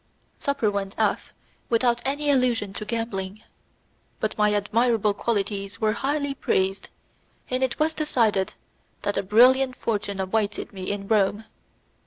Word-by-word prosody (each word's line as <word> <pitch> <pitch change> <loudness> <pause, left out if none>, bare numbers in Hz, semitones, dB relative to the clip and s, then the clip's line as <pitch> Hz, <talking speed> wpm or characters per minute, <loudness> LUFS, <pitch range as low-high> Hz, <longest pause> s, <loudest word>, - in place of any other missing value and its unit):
Supper 280 -7 0
went 200 -1 -3
off 215 -2 0 0.4
without 240 0 +2
any 290 +2 0
allusion 245 -7 +1
to 210 - -5
gambling, 215 -3 -4 0.8
but - - -1
my 210 -1 +3
admirable 215 +1 +2
qualities 200 -1 -2
were 215 -2 +2
highly 285 +3 -1
praised, 195 -7 -1 0.6
and 255 +1 0
it 260 -2 0
was 310 +1 +1
decided 230 -11 +1 0.5
that 205 - -1
a - - +2
brilliant 255 +6 +5
fortune 205 -4 -2
awaited 205 +3 -1
me 185 -1 -5
in 200 -1 -3
Rome. 210 0 +2
220 Hz, 135 wpm, -25 LUFS, 200-250 Hz, 0.8 s, brilliant